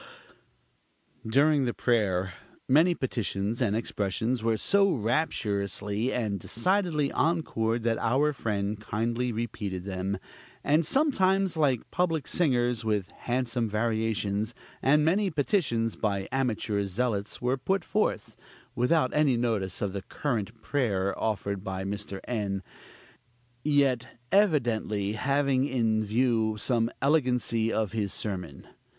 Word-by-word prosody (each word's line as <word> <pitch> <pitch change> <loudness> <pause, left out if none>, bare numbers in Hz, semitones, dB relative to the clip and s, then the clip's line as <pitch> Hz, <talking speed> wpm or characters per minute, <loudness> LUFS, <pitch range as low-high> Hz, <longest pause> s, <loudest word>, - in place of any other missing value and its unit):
During 140 +4 +3
the 120 - -2
prayer, 95 -6 +1 0.3
many 160 +6 +5
petitions 115 -4 -2
and 105 -4 +2
expressions 110 +2 -1
were 115 0 +1
so 200 - +4
rapturously 105 -3 -1
and 105 -5 -1
decidedly 155 - 0
encored, 120 -8 0
that 115 -1 +1
our 140 +6 +2
friend 105 -4 -2
kindly 115 +3 -1
repeated 105 -5 -4
them; 95 0 -3 0.5
and 150 +4 +3
sometimes, 195 - +2
like 140 -7 +1
public 165 -5 0
singers, 125 -8 +1
with 105 -4 0
handsome 120 -2 -2
variations; 110 -1 -1 0.3
and 150 +3 +4
many 195 +5 +2
petitions 145 - 0
by 100 -3 -1
amateur 110 -6 0
zealots 105 0 -2
were 125 +1 +1
put 190 +8 0
forth, - - -1 0.4
without 130 +2 +2
any 145 -5 +3
notice 105 -7 -1
of 100 -2 -2
the 100 - -3
current 110 0 -3
prayer 100 -9 0
offered 100 -3 -2
by 95 -1 -4
Mr. 100 0 -5
N., 100 -5 -2 1.0
yet 140 -5 +1
evidently 120 - +2
having 135 +3 +1
in 115 -5 +1
view 110 0 +1
some 115 +1 +1
elegancy 125 -6 +2
of 110 -4 0
his 105 -3 -2
sermon. 90 -9 -5
115 Hz, 120 wpm, -28 LUFS, 105-140 Hz, 1.0 s, many